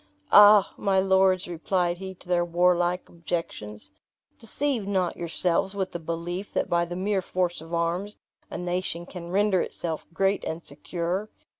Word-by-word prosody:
"Ah! 205 -1 +8
my 195 -2 +2
lords," 190 -1 +3
replied 175 +1 -1
he 190 0 -7
to 180 - -18
their 175 -1 +2
warlike 175 +1 +1
objections, 155 - -5 0.5
"deceive 240 -2 -2
not 185 -3 0
yourselves 175 +3 0
with 190 -2 -2
the 175 - -5
belief 170 +4 -5
that - - 0
by 170 0 +1
the 175 +1 -6
mere 195 +1 0
force 180 -2 -2
of 165 +1 -12
arms, 170 +5 -1 0.3
a - - -5
nation 175 -1 -2
can 175 -1 -9
render 195 0 +2
itself 160 -2 -4
great 195 +4 +1
and 165 +1 -5
secure. 175 +7 -3
180 Hz, 155 wpm, -26 LUFS, 170-190 Hz, 0.5 s, Ah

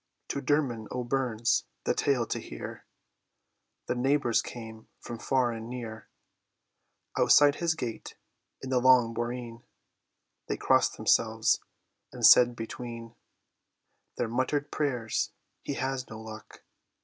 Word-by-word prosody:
'" - - -52
To 140 - -2
Dermod 130 -6 0
O'Byrne's, 120 -2 0 0.2
the - - +1
tale 130 -5 +1
to - - -3
hear, - - -8 1.0
The - - -1
neighbours 130 -1 +2
came 110 -2 -9
from 120 -1 -8
far 130 -1 +1
and 115 0 -7
near: 115 -3 -7 1.1
Outside 145 -1 +6
his 170 -2 +1
gate, 120 -7 -6 0.5
in 130 - -5
the 125 - +3
long 125 -2 +5
boreen, 120 0 -4 0.9
They - - -2
crossed - - +2
themselves, 110 0 +2 0.5
and - - 0
said 120 -1 +8
between 115 0 -7 1.0
Their 120 - 0
muttered 135 +5 -1
prayers, 125 -7 -1 0.3
"He 140 - -4
has 130 -1 -3
no 110 - -8
luck! 110 -1 -11
120 Hz, 125 wpm, -29 LUFS, 115-130 Hz, 1.1 s, said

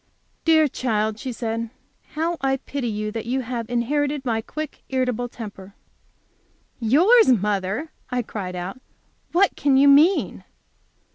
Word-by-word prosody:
"Dear 315 -2 +5
child," 220 -5 -1
she 260 - -4
said, 230 -1 -3 0.5
"how 330 +2 -1
I 270 0 +1
pity 275 -1 -4
you 215 -1 -3
that 225 +1 -5
you 260 +2 0
have 235 -2 -5
inherited 280 +4 -1
my 225 -2 0
quick, 305 +5 -7
irritable 250 -2 -1
temper." 200 -4 -10 1.0
"Yours, 345 - +5
mother!" 210 - 0 0.2
I 250 -1 -1
cried 190 -5 -6
out; 180 +8 -6 0.5
"what 380 +3 +3
can 280 -2 +2
you 280 +1 +6
mean?" 300 +7 +4
245 Hz, 135 wpm, -23 LUFS, 220-285 Hz, 1.0 s, you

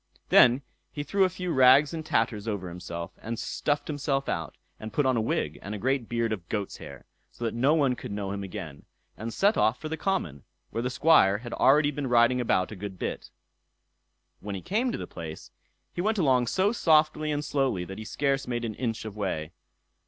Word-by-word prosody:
Then 125 +3 +6 0.3
he 145 - -4
threw 195 +5 +2
a - - +1
few 180 0 -4
rags 130 +4 +6
and 160 -1 -4
tatters 115 -6 0
over 100 -4 -3
himself, 85 -1 -6
and 115 +2 -4
stuffed 145 +5 -2
himself 140 -2 -1
out, 80 -1 -3 0.2
and 110 0 -7
put 145 - +1
on 130 -1 +3
a 115 - +1
wig 75 -8 -2
and 105 +2 -5
a - - -4
great 130 +2 -1
beard 115 -2 0
of 90 -5 -7
goat's 105 -3 -3
hair, 70 -2 -11 0.2
so 120 - -7
that 115 - -1
no 135 +6 +3
one 140 -5 +3
could - - -8
know 100 -1 -3
him 100 0 -4
again, 80 -6 -8 0.3
and 115 +2 -5
set 200 - +2
off 115 +3 +2
for 155 - -6
the 160 - -3
common, 145 - -2 0.3
where 115 - -2
the 125 - -1
Squire 125 -8 +4
had 120 +2 -8
already 145 +2 +4
been 145 -1 -3
riding 120 +1 +4
about 95 -6 +1
a - - -6
good 95 -1 -7
bit. - - -4 1.1
When 100 -1 -5
he 95 - -7
reached 235 +5 0
the - - -5
place, 80 -2 -9 0.4
he 175 - -2
went 215 +3 0
along 130 -8 +3
so 190 - +2
softly 155 -6 +3
and 150 0 -2
slowly 135 -12 0
that 95 +3 -8
he - - -6
scarce 135 +5 -1
made 120 -1 -2
an 110 - -3
inch 115 -1 -3
of 105 -2 -7
way. 85 -7 -3
120 Hz, 210 wpm, -27 LUFS, 100-145 Hz, 1.1 s, Then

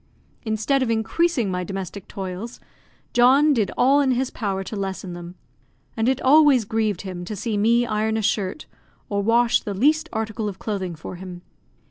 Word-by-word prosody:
Instead 220 +4 0
of 255 - 0
increasing 230 - +1
my 180 0 -2
domestic 195 0 -6
toils, 195 +4 -6 0.5
John 270 +5 +5
did 215 -7 +1
all 275 +3 +4
in 275 - +1
his 255 +1 -1
power 195 -4 -3
to 215 - -7
lessen 190 -2 -4
them; 175 +1 -9 0.6
and 225 +1 +1
it 265 0 0
always 280 -4 +5
grieved 215 -3 -1
him 185 -3 -6
to 210 +4 -5
see 215 +2 -3
me 230 +4 +3
iron 220 0 0
a 220 - -2
shirt, 205 +5 -1 0.4
or 200 -1 0
wash 235 +3 +3
the 205 - -5
least 305 - +2
article 220 -1 -3
of 190 - -8
clothing 190 -5 -4
for 160 +3 -8
him. 180 -1 -9
220 Hz, 175 wpm, -23 LUFS, 195-245 Hz, 0.6 s, John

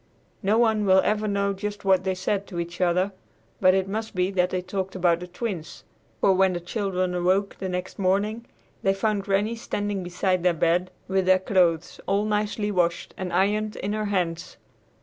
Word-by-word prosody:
No 210 +2 +2
one 220 -2 +3
will 190 0 +6
ever 215 0 0
know 200 -1 0
just 205 +1 -5
what 190 -1 +4
they 190 0 -1
said 195 +2 -2
to 175 -3 -5
each 170 +1 -5
other, 180 +2 +2 0.5
but 185 0 +5
it 190 0 +1
must 220 +2 -4
be 180 +1 +1
that 180 -2 +2
they 185 - -1
talked 190 +1 -4
about 175 -2 +2
the 180 - -7
Twins, 180 -4 -5 0.4
for 195 - +5
when 190 0 +3
the 175 - -2
children 185 0 -2
awoke 185 +3 +1
the 190 - -3
next 180 +2 -4
morning, 205 +5 0 0.3
they 195 0 +2
found 210 0 0
Granny 205 +3 +1
standing 205 -3 -3
beside 180 +1 0
their 175 -1 +2
bed 170 +3 +1 0.2
with 190 -1 0
their 185 0 +6
clothes 180 -3 +1
all 200 +2 +1
nicely 210 0 -1
washed 175 -3 0
and 185 -2 -4
ironed 210 +4 +1
in 205 +2 -3
her 215 0 -1
hands. 175 -5 -2
190 Hz, 190 wpm, -25 LUFS, 180-205 Hz, 0.5 s, will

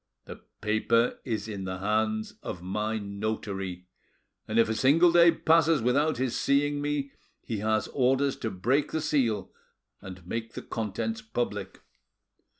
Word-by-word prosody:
The - - -9 0.2
paper 110 +3 +1
is 110 -5 -3
in 100 -3 -5
the 95 0 -4
hands 110 +2 -1
of 90 -3 -6
my 105 +4 -2
notary, 100 -3 -4 0.6
and 110 - -2
if 115 - +5
a 110 - 0
single 150 +10 +5
day 170 0 +7
passes 165 -1 +3
without 140 +6 +2
his 130 -1 -1
seeing 145 +1 +1
me 145 -1 -2 0.3
he 110 -3 -3
has 110 +1 0
orders 135 +1 +2
to 110 - -3
break 120 +10 0
the 160 - +1
seal 125 -9 0 0.5
and 95 -2 -10
make 115 +4 -4
the - - -7
contents 115 - -3
public. 170 - -4
115 Hz, 150 wpm, -28 LUFS, 105-140 Hz, 0.6 s, day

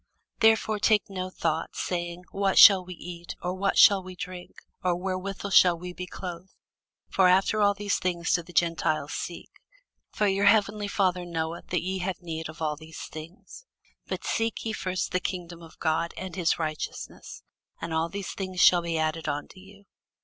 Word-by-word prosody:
Therefore 220 -1 +3
take 210 -1 +2
no 185 -1 -4
thought, 165 -3 -2
saying, 175 0 -3
What 195 -1 0
shall 195 -3 +9
we 180 0 -9
eat? 170 -2 -8
or, 180 +1 -1
What 195 +1 0
shall 200 -2 +7
we 185 0 -10
drink? 180 0 -8 0.3
or, 180 -1 +2
Wherewithal 190 +2 -4
shall 180 -2 +6
we 180 +1 -7
be 180 0 -6
clothed? 180 0 -8 0.5
(for 190 -1 +3
after 190 +4 +3
all 205 0 +4
these 205 -1 -1
things 175 -2 -1
do 175 - +2
the 170 - -14
Gentiles 165 -3 0
seek:) 175 - -6 0.6
for 210 - -1
your 195 +1 +1
heavenly 205 0 +3
Father 185 -3 +1
knoweth 165 -1 -4
that 180 - -1
ye 190 +1 -2
have 185 0 -3
need 160 -2 -5
of 160 +1 -7
all 150 -1 0
these 160 +1 -11
things. 170 - -11 0.4
But - - -4
seek 225 0 -1
ye 220 - -2
first 185 -3 -2
the 185 - +1
kingdom 175 -2 -5
of 165 -1 -14
God, 165 +1 -1
and 185 -2 -6
his 175 -3 +1
righteousness; 155 -2 -5 0.4
and 165 -1 -5
all 160 +1 0
these 200 0 -5
things 185 -2 -5
shall 175 -1 +7
be 170 -1 -2
added 160 0 -1
unto 145 +6 -5
you. 200 +1 -16
180 Hz, 185 wpm, -27 LUFS, 170-195 Hz, 0.6 s, shall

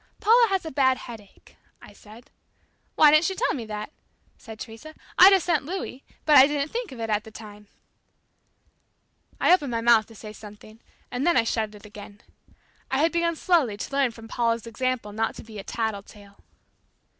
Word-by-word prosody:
"Paula 465 +2 +5
has 385 -3 -1
a 320 - -6
bad 260 -1 +2
headache," 220 -5 -13 0.2
I - - -15
said. 220 +3 -16 0.6
"Why 300 -1 +6
didn't 310 +2 +4
she 380 - -1
tell 485 0 0
me 245 -5 -5
that?" 210 +4 -6 0.4
said 220 -2 -12
Teresa. 235 +8 -10 0.2
"I'd 375 +3 +10
have 385 -2 +3
sent 340 -5 0
Louis, 315 -4 -6 0.2
but 300 -2 +6
I 265 - +8
didn't 295 0 -3
think 475 -1 -4
of 255 - -10
it 225 -1 -3
at 210 0 0
the - - -12
time" 210 -1 -13 1.7
I - - +4
opened 295 -7 +1
my 230 -1 -2
mouth 230 -2 +4
to 225 - -16
say 215 0 -10
something, 215 +1 -14 0.3
and 255 +6 -2
then 345 - +3
I - - +4
shut 220 -2 -2
it 210 - -15
again. 205 0 -12 0.7
I 265 - -1
had 320 +4 +2
begun 335 0 0
slowly 305 - +1
to 205 - -7
learn 275 -2 +2
from 225 -1 -13
Paula's 230 0 -1
example 230 -1 -3
not 220 +2 -2
to - - -10
be 215 -2 -10
a - - -7
"tattle 220 -2 -3
tale." 200 0 -18
235 Hz, 195 wpm, -24 LUFS, 215-305 Hz, 1.7 s, I'd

